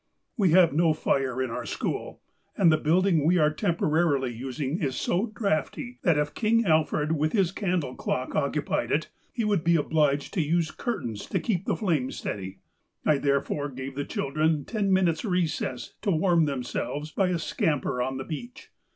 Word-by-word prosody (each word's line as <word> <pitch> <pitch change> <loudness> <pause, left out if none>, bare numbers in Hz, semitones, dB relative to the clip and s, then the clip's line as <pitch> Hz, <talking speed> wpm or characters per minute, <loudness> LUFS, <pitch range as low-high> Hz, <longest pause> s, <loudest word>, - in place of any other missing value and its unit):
"We 200 -6 +3
have 170 -3 +5
no 160 +1 +3
fire 130 -4 0
in 125 - -4
our - - -4
school, - - -4 0.3
and 175 -4 +5
the 155 - +4
building 170 0 +3
we 175 +4 +4
are 155 -2 +4
temporarily 155 - +1
using 135 - -3
is 135 -4 -1
so 190 +7 0
drafty, 215 - -2
that 170 -5 +3
if 150 0 0
King 230 +1 +2
Alfred 155 -2 +2
with 155 -1 0
his 190 -5 +2
candle 180 - -1
clock 130 0 -3
occupied 150 0 -1
it, 155 +2 0 0.2
he 230 - -2
would 205 -6 +1
be 170 0 +4
obliged 150 -2 +1
to 180 - +1
use 160 +1 +1
curtains 120 - -4
to - - -1
keep 195 -4 -1
the - - +1
flame 160 - 0
steady. 95 -1 -5 0.5
I 150 -2 +3
therefore 140 +1 0
gave 130 0 -6
the 145 +2 -3
children 155 +2 0
ten 205 -3 -1
min 190 0 +4
utes 165 -2 0
recess 175 - -2
to 205 - -1
warm 170 -1 +3
themselves 145 +2 -3
by 190 +3 +1
a 180 -1 0
scamper 150 -5 -1
on 130 +1 -2
the 135 - -5
beach. 240 - -8
155 Hz, 180 wpm, -27 LUFS, 140-180 Hz, 0.5 s, have